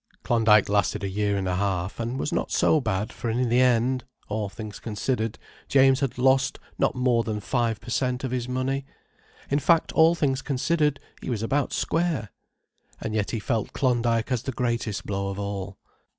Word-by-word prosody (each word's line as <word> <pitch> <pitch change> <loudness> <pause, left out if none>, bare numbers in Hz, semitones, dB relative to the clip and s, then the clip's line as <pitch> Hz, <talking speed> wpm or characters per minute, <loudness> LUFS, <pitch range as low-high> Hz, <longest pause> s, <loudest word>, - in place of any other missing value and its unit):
Klondyke 110 -3 +4
lasted 100 0 +1
a - - 0
year 100 +1 0
and 95 -1 -2
a 90 0 0
half, 95 -1 -1
and 120 +3 -2
was 145 - -2
not - - -1
so 155 - +3
bad, 105 -2 -2
for 120 - -4
in 120 +2 0
the 120 +2 +4
end, 125 0 +2 0.3
all 105 -1 -2
things 105 +1 -8
considered, 110 0 -2 0.3
James 135 -1 +5
had 135 -3 -2
lost 130 +1 +3 0.2
not - - +2
more 125 -2 +2
than 105 -1 -3
five 115 0 -1
per 120 - -9
cent. 125 +1 0
of 130 - -2
his 125 -1 -2
money. 130 +2 -1 0.7
In 140 - +3
fact, 165 +3 +3
all 160 +1 +5
things 135 -4 0
considered, 150 +1 0 0.2
he - - -6
was 115 -3 -2
about 140 +5 0
square. 160 - -1 0.7
And 110 - -4
yet 105 -2 0
he 115 - -2
felt 110 0 -2
Klondyke 120 -2 +1
as 125 -3 +1
the 135 - -4
greatest 115 -4 -2
blow 100 -1 -2
of 100 0 -4
all. 100 -1 -4
120 Hz, 190 wpm, -25 LUFS, 105-130 Hz, 0.7 s, James